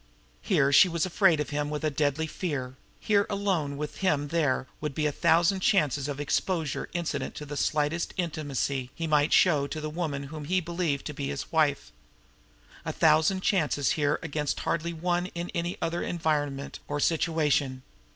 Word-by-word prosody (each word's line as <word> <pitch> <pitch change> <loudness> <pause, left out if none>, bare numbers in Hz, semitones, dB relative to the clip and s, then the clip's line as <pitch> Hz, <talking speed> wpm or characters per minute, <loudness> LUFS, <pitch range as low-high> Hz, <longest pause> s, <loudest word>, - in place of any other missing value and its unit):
Here 140 +1 +2
she 185 +6 +7
was 170 0 0
afraid 180 -3 +3
of 150 - -3
him 145 0 -1
with 150 +1 -4
a 155 - +1
deadly 145 +2 0
fear; 145 -6 -4 0.3
here 205 -1 +2
alone 185 -9 -1
with 150 0 -5
him 150 -7 0
there 150 -5 +1
would 150 -3 -4
be 155 - 0
a 150 - +2
thousand 170 +5 +3
chances 150 - +2
of 145 -1 -4
exposure 155 +1 -1
incident 165 -5 -3
to 150 - -6
the 145 0 -6
slightest 150 +3 0
intimacy 140 -6 -2
he 165 - -3
might 150 -1 +2
show 150 -6 +4
the 155 +1 -5
woman 150 -4 -3
whom 155 -2 -6
he 185 +4 +2
believed 170 -4 -2
to 150 - -4
be 140 -1 -4
his 140 0 -5
wife 155 -4 +1 0.9
a - - -3
thousand 160 +4 +3
chances 155 -8 +1
here 150 -1 +1
against 150 -2 -2
hardly 170 +1 -1
one 175 +2 -1
in 170 +1 -4
any 170 +1 -2
other 170 +1 -1
environment 145 -4 -2
or 145 0 -2
situation. 150 -5 +1
155 Hz, 170 wpm, -28 LUFS, 145-170 Hz, 0.9 s, she